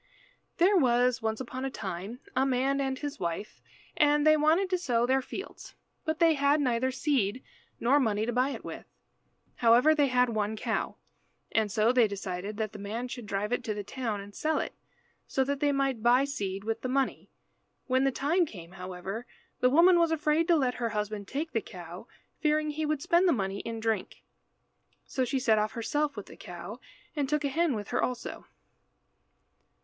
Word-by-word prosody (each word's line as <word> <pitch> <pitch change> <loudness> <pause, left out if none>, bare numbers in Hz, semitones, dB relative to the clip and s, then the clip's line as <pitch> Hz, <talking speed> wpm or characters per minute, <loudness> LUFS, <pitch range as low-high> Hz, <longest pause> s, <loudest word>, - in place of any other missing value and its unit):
There 375 +4 +5
was 250 -5 +3
once 220 0 -1
upon 260 0 -5
a 270 - -1
time 200 +3 -6
a 265 - +3
man 270 +1 +1
and 265 -1 -1
his 290 +1 -5
wife, 170 +4 -4 0.3
and 295 -1 +3
they 310 0 +7
wanted 315 +6 +3
to 365 - +2
sow 240 -8 +1
their 265 +2 +2
fields, 380 +9 -8 0.3
but 315 -1 -1
they 330 -1 +5
had 285 +1 +3
neither 255 -2 +1
seed 260 -4 0 0.4
nor 270 +5 +4
money 220 -4 +1
to 240 - -2
buy 255 +3 +2
it - - -6
with. - - -7 0.7
However, 240 +6 +5
they 290 -2 +3
had 250 -1 +3
one 215 -1 -1
cow, - - -2 0.6
and 220 -2 +1
so 220 +2 +3
they 245 -3 +5
decided 200 0 -5
that 220 -1 -2
the 210 - -8
man 225 +5 -4
should 245 -3 -7
drive 205 +3 -1
it 245 - -1
to 215 - -2
the 205 - -4
town 225 -2 -3
and 200 +1 -11
sell 315 +6 0
it, - - -2 0.5
so 265 - +1
that 280 +1 -2
they 290 0 +2
might 275 -4 0
buy 245 +3 +5
seed 200 -8 -4
with 225 +1 -2
the 255 - -3
money. 270 +1 -1 0.6
When 260 0 +2
the 270 - +3
time 325 +7 +1
came, 175 -8 -10
however, 190 +5 -6 0.3
the 250 - +4
woman 345 +5 +6
was 335 -1 +4
afraid 315 +1 +1
to 345 - +5
let 260 -5 +2
her 230 - +1
husband 210 -1 -3
take 310 +7 -3
the 225 - 0
cow, 175 +3 -10 0.3
fearing 305 0 +1
he 310 +1 -2
would 300 -2 -1
spend 345 +2 +4
the 345 - +5
money 195 -4 -2
in 230 +1 -5
drink. 225 -1 -2 0.8
So 260 - -1
she 270 - -1
set 225 -4 +3
off 215 +1 -1
herself 290 +5 -1
with 205 - -5
the - - -13
cow, 180 +6 -8 0.4
and 285 -3 -1
took 300 0 +1
a - - +1
hen 320 -1 +1
with 205 -2 -5
her - - 0
also. 250 -1 -4
250 Hz, 195 wpm, -29 LUFS, 215-290 Hz, 0.8 s, they